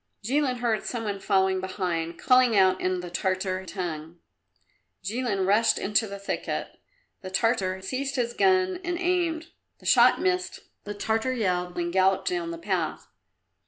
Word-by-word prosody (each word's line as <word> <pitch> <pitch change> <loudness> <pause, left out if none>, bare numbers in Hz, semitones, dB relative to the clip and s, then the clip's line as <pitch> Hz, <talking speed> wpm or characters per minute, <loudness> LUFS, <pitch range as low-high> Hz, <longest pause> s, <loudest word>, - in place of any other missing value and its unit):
Jilin 265 +3 +1
heard 235 -3 -1
some 235 -2 -4
one 205 -2 -3
following 190 -1 +2
behind, 175 -3 -3
calling 255 -4 +4
out 185 -1 +4
in 185 -1 0
the 175 -1 -8
Tartar 185 +1 -1
tongue. 170 -3 -5 0.9
Jilin 210 -1 -1
rushed 210 +4 +3
into 210 +2 +1
the 200 0 -7
thicket. 200 - -3 0.5
The 185 - -7
Tartar 190 -2 0
seized 270 +6 -3
his 240 -2 -1
gun 375 +1 +2
and 350 0 -2
aimed; 345 -2 -1 0.3
the - - -19
shot - - +5
missed; 365 -1 -1 0.2
the 205 0 -5
Tartar 220 +5 0
yelled 180 -6 -1
and 175 0 -2
galloped 190 0 +2
down 360 -2 -2
the 335 - -5
path. 335 - -3
205 Hz, 155 wpm, -26 LUFS, 185-260 Hz, 0.9 s, shot